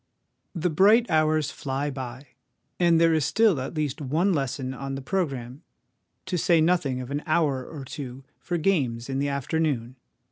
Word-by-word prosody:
The 170 Hz, +1 st, 0 dB
bright 210 Hz, +9 st, +5 dB
hours 155 Hz, -2 st, +2 dB
fly 140 Hz, +1 st, -3 dB
by; 130 Hz, 0 st, -7 dB, 0.5 s
and 170 Hz, -2 st, +4 dB
there 165 Hz, 0 st, +4 dB
is 155 Hz, -2 st, +2 dB
still 205 Hz, -, +3 dB
at 135 Hz, +5 st, -5 dB
least 150 Hz, -1 st, -2 dB
one 160 Hz, +8 st, +1 dB
lesson 135 Hz, -3 st, -2 dB
on 135 Hz, 0 st, -5 dB
the 135 Hz, -, -5 dB
programme, 135 Hz, -6 st, -3 dB, 0.6 s
to 185 Hz, -2 st, -1 dB
say 170 Hz, +1 st, +4 dB
nothing 155 Hz, -6 st, +1 dB
of 125 Hz, +2 st, -8 dB
an 145 Hz, +1 st, -2 dB
hour 150 Hz, -5 st, +1 dB
or 140 Hz, 0 st, -8 dB
two 135 Hz, -3 st, -7 dB, 0.2 s
for 175 Hz, +8 st, -2 dB
games 135 Hz, -9 st, 0 dB
in 135 Hz, -, -1 dB
the 140 Hz, 0 st, 0 dB
afternoon. 140 Hz, -3 st, -1 dB
145 Hz, 170 wpm, -26 LUFS, 130-165 Hz, 0.6 s, bright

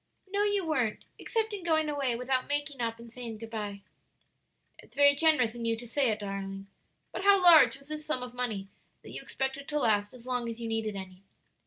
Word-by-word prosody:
"No, 400 Hz, +1 st, -1 dB
you 410 Hz, -3 st, +1 dB
weren't, 255 Hz, -9 st, -1 dB
except 445 Hz, -2 st, -1 dB
in 395 Hz, -3 st, -5 dB
going 315 Hz, -2 st, +2 dB
away 280 Hz, -5 st, -1 dB
without 255 Hz, +1 st, -1 dB
making 290 Hz, -2 st, -2 dB
up 230 Hz, -1 st, -1 dB
and 235 Hz, 0 st, -13 dB
saying 235 Hz, -3 st, -6 dB
good 225 Hz, +1 st, -9 dB
by." 205 Hz, -3 st, -5 dB, 1.0 s
"It's -, -, -16 dB
very 285 Hz, 0 st, +6 dB
generous 285 Hz, -6 st, +3 dB
in 240 Hz, -1 st, -7 dB
you 230 Hz, 0 st, +1 dB
to 240 Hz, +1 st, -9 dB
say 265 Hz, +2 st, +2 dB
it, 215 Hz, -1 st, -1 dB
darling. 195 Hz, -1 st, -5 dB, 0.5 s
But -, -, -5 dB
how 400 Hz, 0 st, +6 dB
large 320 Hz, -9 st, +7 dB
was 275 Hz, +1 st, -17 dB
this 305 Hz, 0 st, -4 dB
sum 300 Hz, -5 st, -1 dB
of 250 Hz, -1 st, -8 dB
money 225 Hz, -6 st, -2 dB, 0.4 s
that -, -, -11 dB
you -, -, -7 dB
expected 270 Hz, +1 st, -4 dB
to 300 Hz, 0 st, -1 dB
last 205 Hz, -5 st, +2 dB
as 240 Hz, -1 st, -12 dB
long 250 Hz, -2 st, -2 dB
as 230 Hz, 0 st, -6 dB
you 230 Hz, -, -4 dB
needed 225 Hz, -2 st, -2 dB
any?" 190 Hz, -1 st, -8 dB
250 Hz, 215 wpm, -29 LUFS, 225-300 Hz, 1.0 s, large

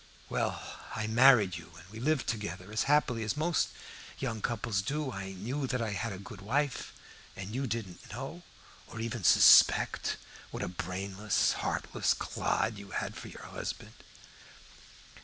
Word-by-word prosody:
Well, -, -, -1 dB, 0.4 s
I 110 Hz, -, -2 dB
married 110 Hz, -5 st, +6 dB
you 85 Hz, -, -12 dB
and 85 Hz, -, -14 dB
we 110 Hz, -, -8 dB
lived 150 Hz, +3 st, +1 dB
together 105 Hz, -2 st, -4 dB
as 110 Hz, 0 st, +1 dB
happily 145 Hz, -6 st, +3 dB
as 110 Hz, +6 st, -2 dB
most 160 Hz, +1 st, +1 dB, 0.5 s
young 115 Hz, -5 st, -3 dB
couples 110 Hz, -3 st, -1 dB
do. 145 Hz, +6 st, -2 dB
I 95 Hz, -3 st, -5 dB
knew 125 Hz, +9 st, -3 dB
that 125 Hz, -1 st, -1 dB
I 115 Hz, -2 st, -1 dB
had 100 Hz, +4 st, -2 dB
a 95 Hz, -, -5 dB
good 100 Hz, 0 st, -10 dB
wife, 135 Hz, +7 st, -1 dB, 0.4 s
and 100 Hz, +2 st, -6 dB
you 135 Hz, +2 st, -1 dB
didn't 105 Hz, -6 st, -5 dB
know, 135 Hz, +9 st, -6 dB, 0.5 s
or 115 Hz, -, -8 dB
even 115 Hz, -2 st, -3 dB
suspect, -, -, +6 dB, 0.3 s
what -, -, -4 dB
a -, -, -2 dB
brainless, 95 Hz, +3 st, 0 dB
heartless -, -, 0 dB
clod 110 Hz, -2 st, -1 dB
you 100 Hz, -1 st, -10 dB
had -, -, -3 dB
for -, -, -8 dB
your -, -, -10 dB
husband. -, -, -6 dB
110 Hz, 160 wpm, -31 LUFS, 100-130 Hz, 0.5 s, married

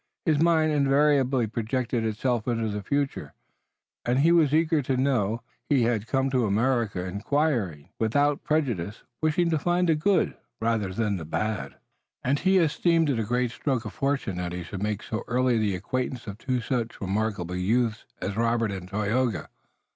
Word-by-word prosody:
His 155 Hz, -3 st, +2 dB
mind 160 Hz, -2 st, +4 dB
invariably 140 Hz, -3 st, +3 dB
projected 115 Hz, +2 st, -2 dB
itself 110 Hz, +2 st, -1 dB
into 115 Hz, -2 st, 0 dB
the 105 Hz, 0 st, -3 dB
future, 140 Hz, +5 st, -2 dB, 0.7 s
and 120 Hz, +1 st, +1 dB
he 155 Hz, +5 st, +4 dB
was 165 Hz, -5 st, +4 dB
eager 160 Hz, 0 st, +3 dB
to 130 Hz, -1 st, -1 dB
know. 120 Hz, -4 st, +1 dB, 0.3 s
He 135 Hz, -4 st, +4 dB
had 115 Hz, -2 st, 0 dB
come 135 Hz, +1 st, +1 dB
to 125 Hz, -4 st, +2 dB
America, 110 Hz, -3 st, +1 dB
inquiring, 100 Hz, -, -1 dB
without 145 Hz, +6 st, +2 dB
prejudices, 120 Hz, -, -1 dB, 0.2 s
wishing 165 Hz, +2 st, +2 dB
to 160 Hz, -, +2 dB
find 175 Hz, +3 st, +1 dB
the 165 Hz, -, +5 dB
good 185 Hz, +6 st, +2 dB, 0.2 s
rather 110 Hz, -4 st, 0 dB
than 105 Hz, 0 st, -1 dB
the 80 Hz, -, -6 dB
bad, 110 Hz, +7 st, -2 dB, 0.5 s
and 140 Hz, +3 st, +1 dB
he 190 Hz, +1 st, +3 dB
esteemed 165 Hz, -1 st, +3 dB
it 120 Hz, -, 0 dB
a -, -, +1 dB
great 125 Hz, +2 st, 0 dB
stroke 130 Hz, -3 st, -2 dB
of -, -, -6 dB
fortune 135 Hz, -, -1 dB
that 90 Hz, -1 st, -3 dB
he 90 Hz, 0 st, -4 dB
should 95 Hz, +2 st, -7 dB
make 105 Hz, 0 st, -2 dB
so 110 Hz, -, -4 dB
early 125 Hz, -1 st, +2 dB
the 105 Hz, -3 st, +1 dB
acquaintance 125 Hz, +6 st, -3 dB
of 100 Hz, 0 st, -7 dB
two 125 Hz, -1 st, -1 dB
such 120 Hz, -1 st, -2 dB
remarkable 95 Hz, -3 st, -2 dB
youths 110 Hz, +4 st, 0 dB, 0.2 s
as 95 Hz, -, -2 dB
Robert 115 Hz, -1 st, +1 dB
and 95 Hz, -2 st, -6 dB
Tayoga. 105 Hz, +2 st, 0 dB
120 Hz, 170 wpm, -26 LUFS, 105-140 Hz, 0.7 s, the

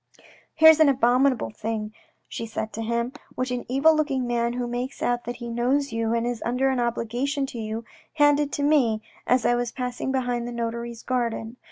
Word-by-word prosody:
" -, -, -26 dB
Here's 320 Hz, 0 st, +8 dB
an 310 Hz, -2 st, +6 dB
abominable 255 Hz, -, +2 dB
thing," 215 Hz, -, -4 dB, 0.3 s
she 230 Hz, -, -5 dB
said 220 Hz, 0 st, -4 dB
to 225 Hz, -, -4 dB
him, 235 Hz, +2 st, -1 dB
" -, -, -26 dB
which 255 Hz, 0 st, -2 dB
an 245 Hz, -1 st, -3 dB
evil 285 Hz, +5 st, +4 dB
looking 275 Hz, -4 st, 0 dB
man 235 Hz, 0 st, 0 dB
who 245 Hz, 0 st, -2 dB
makes 245 Hz, +2 st, -4 dB
out 240 Hz, 0 st, 0 dB
that 240 Hz, -, -4 dB
he 240 Hz, 0 st, -7 dB
knows 250 Hz, +4 st, 0 dB
you 225 Hz, 0 st, 0 dB
and 230 Hz, 0 st, 0 dB
is 240 Hz, -2 st, -3 dB
under 250 Hz, +3 st, +1 dB
an 260 Hz, -, -1 dB
obligation 240 Hz, +4 st, -1 dB
to 245 Hz, -3 st, -7 dB
you, 220 Hz, +1 st, -4 dB, 0.3 s
handed 290 Hz, -1 st, +3 dB
to 285 Hz, -, -1 dB
me 250 Hz, -8 st, +3 dB, 0.2 s
as 250 Hz, -1 st, +3 dB
I -, -, +4 dB
was 240 Hz, 0 st, -1 dB
passing 250 Hz, 0 st, -3 dB
behind 245 Hz, -2 st, -1 dB
the -, -, -5 dB
notary's 235 Hz, 0 st, -4 dB
garden. 235 Hz, -2 st, -2 dB
245 Hz, 205 wpm, -25 LUFS, 235-265 Hz, 0.3 s, Here's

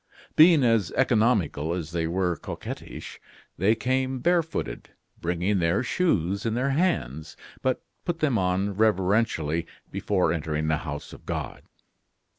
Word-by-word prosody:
Being 160 Hz, -2 st, +7 dB
as 115 Hz, -7 st, +3 dB
economical 105 Hz, -, +2 dB
as 85 Hz, -3 st, -5 dB
they 85 Hz, -1 st, -1 dB
were 90 Hz, 0 st, 0 dB
coquettish, -, -, -8 dB, 0.4 s
they 105 Hz, +5 st, +4 dB
came 130 Hz, +3 st, 0 dB
barefooted, 165 Hz, +3 st, -1 dB, 0.3 s
bringing 90 Hz, +4 st, 0 dB
their 85 Hz, +7 st, +2 dB
shoes 100 Hz, -, 0 dB
in 115 Hz, -2 st, -1 dB
their 130 Hz, +3 st, +1 dB
hands, 80 Hz, -, -1 dB, 0.2 s
but 130 Hz, -1 st, 0 dB, 0.2 s
put 175 Hz, -2 st, -2 dB
them 155 Hz, -6 st, +1 dB
on 95 Hz, +2 st, 0 dB
reverentially 95 Hz, -5 st, +1 dB, 0.2 s
before 90 Hz, -5 st, +1 dB
entering 80 Hz, -1 st, -2 dB
the 80 Hz, -, +2 dB
house 75 Hz, -2 st, -6 dB
of -, -, -14 dB
God. -, -, -4 dB
100 Hz, 130 wpm, -26 LUFS, 85-130 Hz, 0.4 s, Being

